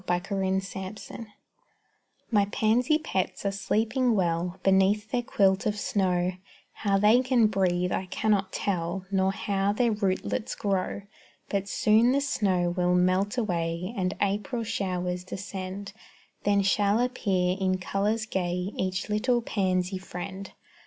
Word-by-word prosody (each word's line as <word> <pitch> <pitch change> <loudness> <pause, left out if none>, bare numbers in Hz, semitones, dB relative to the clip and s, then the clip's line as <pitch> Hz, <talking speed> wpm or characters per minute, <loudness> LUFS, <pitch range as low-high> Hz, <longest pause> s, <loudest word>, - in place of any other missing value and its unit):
_ - - -7
MY 175 0 +3
PANSY 190 0 -2
PETS - - -11 1.2
My 205 -3 +4
pansy 230 +8 +2
pets 195 - -3
are 200 - +2
sleeping 225 +4 +1
well 175 -1 0
Beneath 195 +3 +3
their 245 - +1
quilt 195 -4 +2
of 210 0 -1
snow; 185 -3 +1 0.4
How 200 -2 +1
they 215 +5 +5
can 255 -3 +3
breathe 180 -4 +1
I 185 - -2
cannot 200 0 0
tell, 180 -1 -2
Nor 190 0 +2
how 200 0 0
their 235 +2 +2
rootlets 210 +1 -1
grow; 200 -1 -1 0.5
But 200 0 -2
soon 225 +5 +4
the 280 - +2
snow 195 -10 +1
will 180 0 +1
melt 185 +5 +2
away 175 -3 -1
And 185 -1 -1
April 210 +5 -1
showers 180 -5 -2
descend; 195 +1 -6 0.5
Then 200 -1 +3
shall 200 +2 +2
appear 195 -8 +1
in 185 -1 +1
colors 205 +5 -1
gay 180 -2 -2
Each 185 0 -2
little 235 +3 +1
pansy 185 -3 0
friend. 190 +1 -7
195 Hz, 140 wpm, -27 LUFS, 185-215 Hz, 1.2 s, they